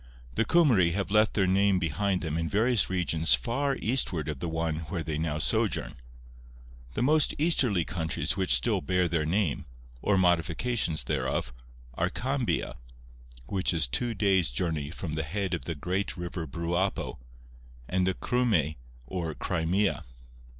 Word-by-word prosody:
The 115 - +1
Cymry 115 - +5
have 100 +1 -2
left 105 +1 +3
their 95 - +3
name 95 +1 +3
behind 90 +3 0
them 80 -2 -3
in 80 0 -1
various 115 +2 +2
regions 85 -4 +2
far 135 +3 -1
eastward 100 - 0
of 75 -3 -4
the 85 - -3
one 80 -1 -1
where 85 -3 -3
they 80 -1 -3
now 80 -2 -1
sojourn. 75 - 0 1.0
The 120 - -1
most 150 +2 +3
easterly 125 - +2
countries 80 -3 -2
which 95 -2 -1
still 65 -2 +3
bear 90 +4 +1
their 80 -2 0
name, 85 -4 0 0.4
or 105 - +2
modifications 90 - +1
thereof, - - -2 0.4
are 85 +7 0
Cambia, 130 +4 -2 0.7
'which 95 +6 0
is 80 -5 +1
two 115 - 0
dayes 95 -5 +3
journey 75 +2 -2
from 80 -1 -6
the 80 - -1
head 95 +5 -2
of 85 - -3
the 80 - -3
great 90 +7 -2
river 85 -1 -5
Bruapo,' 85 +2 -2 0.7
and 90 0 +1
the 95 - +1
Cryme 110 - +1 0.3
or 85 0 -4
Crimea. 90 +3 0
90 Hz, 150 wpm, -28 LUFS, 80-105 Hz, 1.0 s, Cymry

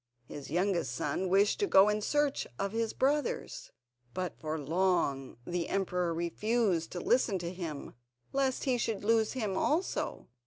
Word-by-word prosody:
His 140 +2 -8
youngest 175 - 0
son 150 +8 -1
wished 200 +2 +3
to 405 - +1
go 195 - +7
in 210 0 +1
search 290 +4 0
of 200 - -2
his 225 0 -1
brothers, 295 - -1 0.5
but 185 -2 -2
for 155 0 -3
long 150 -4 0
the 175 -1 -2
emperor 180 -3 0
refused 175 +1 0
to 180 - -3
listen 235 -1 +2
to 175 0 -5
him, 165 -6 -6 0.4
lest 270 -1 +1
he 255 -3 +1
should 225 -4 -2
lose 225 0 +2
him 215 -7 -2
also. 320 - -1
190 Hz, 155 wpm, -31 LUFS, 170-230 Hz, 0.5 s, go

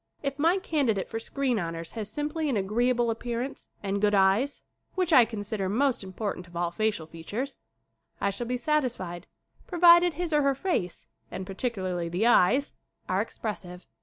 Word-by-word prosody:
If 275 0 -3
my 335 +5 +4
candidate 275 - 0
for 225 - -4
screen 255 0 -1
honors 165 -1 -4
has 215 -2 -6
sim 295 +5 -2
ply 320 0 -2
an 270 -7 +1
agreeable 235 +4 +1
appearance 240 +3 -4 0.2
and 200 0 -1
good 210 0 +3
eyes 200 +9 +2 0.3
which 365 -3 +1
I 250 -5 +8
consider 205 -3 -3
most 255 +2 +1
important 190 -1 -4
of 175 - -16
all 170 0 0
facial 210 -3 -1
features 185 - -5 0.6
I 200 - +1
shall 235 +4 -4
be 250 +1 -1
satisfied 240 - -1 0.4
provided 345 -1 +6
his 345 -2 -2
or 300 - +4
her 275 -1 +2
face, 265 - -2 0.2
and 190 - -5
particularly 185 -4 -2
the 180 +6 0
eyes, 240 +5 +4 0.3
are 185 +1 +1
expres 215 -2 -4
sive. 180 -1 -11
225 Hz, 170 wpm, -28 LUFS, 190-275 Hz, 0.6 s, I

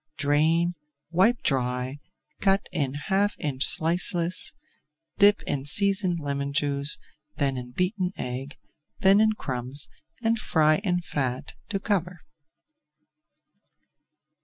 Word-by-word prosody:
Drain, 160 +4 +1 0.4
wipe 200 +8 +2
dry, 125 0 -2 0.4
cut 195 0 +1
in 140 -6 -2
half 195 +8 0
inch 135 -2 -1
slices, 175 +2 +3 0.7
dip 205 +1 +5
in 135 -2 -3
seasoned 195 +1 +2
lemon 140 -1 -3
juice, 140 -1 +4 0.4
then 140 -2 -1
in 125 -1 -7
beaten 180 - -2
egg, 130 +3 -6 0.4
then 195 +2 +5
in 220 0 +3
crumbs, 130 - -1 0.3
and 225 0 +1
fry 155 -5 +2
in 180 -3 -1
fat 130 -6 -4 0.2
to 200 -3 -2
cover. 180 -4 -2
160 Hz, 110 wpm, -25 LUFS, 140-195 Hz, 0.7 s, dip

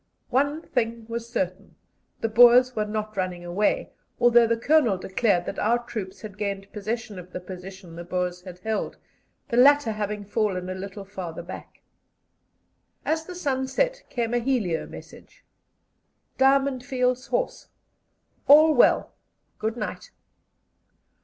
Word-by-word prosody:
One 285 +5 +1
thing 230 -3 -2
was 230 0 -5
certain: 190 -2 -3 0.5
the - - +1
Boers 245 +3 +6
were 210 -1 -1
not 215 0 -4
running 180 -2 -3
away, 185 +4 0 0.3
although 240 -1 +6
the 230 0 +1
Colonel 250 -5 +3
declared 190 -1 +1
that - - -5
our 230 +3 +3
troops 200 -5 -6
had 210 -1 -9
gained 200 -1 -4
possession 215 -1 -4
of 180 0 -12
the - - -4
position 185 -1 -10
the 170 - -7
Boers 180 0 -2
had 180 -1 -10
held, 220 +2 -2 0.5
the 235 - -1
latter 280 -1 +6
having 210 -1 -4
fallen 195 -4 -1
a - - -2
little 195 +1 -7
farther 180 -4 -7
back. 180 - -10 1.2
As 320 0 0
the 360 - -8
sun 265 -6 -1
set - - 0
came 235 -1 -2
a 240 - +3
helio 230 -10 -1
message: - - -13 0.9
"Diamond 270 -1 +3
Fields 250 -1 0
Horse. - - -2 0.8
All 310 +2 +8
well. 245 - +4 0.5
Good 220 +2 -2
night." - - -5
220 Hz, 140 wpm, -25 LUFS, 190-250 Hz, 1.2 s, All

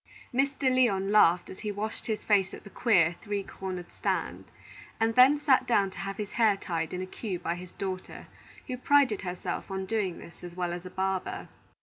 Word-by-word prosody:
Mr. 275 +2 0
Lyon 200 -6 +2
laughed 180 -4 +5
as 190 - -10
he 210 -1 -3
washed 210 +2 -4
his 220 -2 -2
face 195 -3 +2
at - - -13
the 200 - -12
queer, 175 -9 +3
three 205 -2 -2
cornered 185 -2 -6
stand, - - -2 0.5
and 225 0 +2
then 255 +5 +7
sat 290 -3 +3
down 200 -5 +3
to - - -10
have 195 0 -4
his 210 -1 -4
hair 220 -4 +3
tied 165 -4 -3
in 180 0 -3
a - - -3
queue 190 0 -5
by 170 -1 -2
his 180 0 -9
daughter, 185 -1 -5 0.4
who 255 -2 -4
prided 270 -4 +3
herself 180 -1 -4
on 190 0 -3
doing 195 -4 -1
this 170 - -13
as 175 -1 -8
well 175 -1 -2
as 175 +1 -6
a - - -8
barber. 190 0 -2
195 Hz, 205 wpm, -29 LUFS, 180-225 Hz, 0.5 s, then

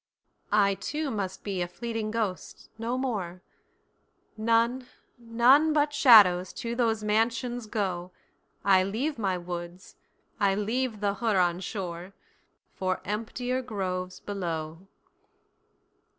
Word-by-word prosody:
I 200 -1 +4
too 300 +8 -3
must 195 -4 -4
be 195 -3 -3
a 175 - -1
fleeting 225 +3 -4
ghost—no 225 +2 -4
more—None, 230 +2 -3 0.3
none 245 +7 +4
but 295 -1 +2
shadows 200 -10 +7
to 235 0 -4
those 225 -3 0
mansions 230 +2 0
go;I 190 -1 -1
leave 230 +9 -2
my 190 -4 0
woods, 175 +1 -8 0.4
I 195 -1 +3
leave 220 +2 -2
the 200 -1 +1
Huron 185 -6 +1
shore, 180 -1 -6 0.6
For 185 -1 -2
emptier 245 +5 -2
groves 185 -6 -4
below! 170 -3 -5
210 Hz, 100 wpm, -28 LUFS, 185-235 Hz, 0.6 s, shadows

